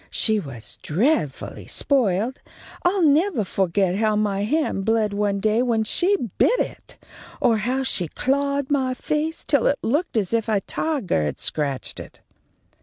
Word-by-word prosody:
She 220 -2 +2
was 135 - -7
dreadfully 165 - -1
spoiled. 240 -2 +1 0.4
I'll 360 +1 +2
nevah 310 - +3
fo'get 190 0 0
how 215 0 +2
my 205 -1 0
hand 295 -6 0
bled 220 -1 +1
one 200 -1 0
day 215 +3 +2
when 230 -3 +1
she 365 - +2 0.2
bit - - +4
it, - - -5 0.4
or 235 -3 +3
how 250 +5 -1
she 185 -9 0
clawed 280 - -1
my 260 -3 +1
face 305 +5 -2
till 285 -6 +3
it 285 - +2
looked 290 +3 0
as 205 -1 -1
if 225 -1 0
a 210 -2 +2
tigah 245 - -1
had 75 - -4
scratched 140 -4 0
it." - - -11
225 Hz, 155 wpm, -23 LUFS, 200-280 Hz, 0.4 s, bit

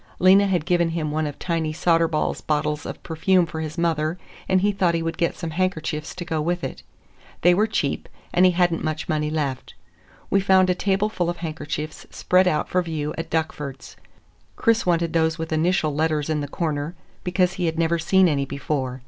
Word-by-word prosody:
Lena 195 +2 +6
had 180 -5 0
given 175 -1 +2
him 160 -2 -2
one 155 0 0
of 145 - -6
Tiny 165 -3 -1
Soderball's 165 -1 +1
bottles 150 -1 -1
of - - -8
perfume 175 +2 +2
for 160 0 -6
his 155 -1 -5
mother, 165 -1 0 0.3
and 185 -1 +3
he 205 +1 +3
thought 185 -4 +1
he 165 - -1
would 165 0 -2
get 170 - +1
some 165 -2 -4
handkerchiefs 160 -3 -2
to 175 - -6
go 160 -2 -1
with 175 +2 -1
it. - - -5 0.6
They 175 +1 +6
were 210 +5 +2
cheap, 145 -10 -2 0.2
and 180 - +4
he 185 -1 +6
had 175 -1 +3
n't 165 - -3
much 155 -1 -3
money 150 -1 0
left. 145 -4 -3 0.6
We 195 - +4
found 190 -1 +4
a - - +3
tableful 190 -1 0
of 175 - -3
handkerchiefs 155 -2 -5
spread 185 +1 +2
out 155 - +1
for 180 - +1
view 155 -3 -3
at 165 0 -5
Duckford's. 150 -4 -4 0.6
Chris 230 -4 +2
wanted 170 -1 +1
those 160 -1 +2
with 160 -1 -4
initial 160 -1 +1
letters 155 0 0
in 150 -1 0
the 145 - -3
corner, 150 +1 -3 0.3
because 180 0 +1
he 180 -2 -1
had 160 0 -2
never 165 0 +1
seen 190 +3 +4
any 140 -4 +1
before. 135 -2 -3
165 Hz, 200 wpm, -23 LUFS, 155-180 Hz, 0.6 s, Lena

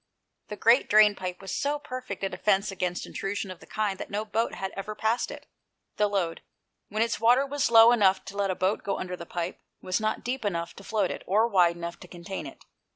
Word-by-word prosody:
The 210 - -6
great 230 +5 +4
drain 210 0 +7
pipe 185 -2 -6
was 195 - -6
so 290 +1 0
perfect 255 -8 -7
a 195 - +1
defence 200 -1 +1
against 180 -2 -2
intrusion 195 0 -4
of 180 - -10
the - - -16
kind 210 -3 -2
that - - -6
no 210 +2 -2
boat 220 +2 -1
had 190 0 -4
ever 210 +2 -5
passed 220 +3 0
it. - - -9 0.5
The 210 - +3
Lode, 190 -5 -1 0.5
when 215 +2 +1
its 230 0 -2
water 245 +5 +4
was 285 -1 0
low 230 0 +8
enough 195 -5 +3
to 195 +1 -9
let 200 -1 0
a 185 - 0
boat 185 +4 0
go 200 - -2
under 180 -1 -4
the 170 -1 -10
pipe, 175 0 -4 0.2
was 185 +2 -1
not 215 0 -1
deep 250 +1 -3
enough 170 -4 -2
to 195 - -11
float 205 -2 0
it, - - -6
or 215 +5 +3
wide 180 -6 +4
enough 170 0 -6
to 180 - -12
contain 175 +2 -7
it. - - -13
200 Hz, 230 wpm, -27 LUFS, 185-225 Hz, 0.5 s, low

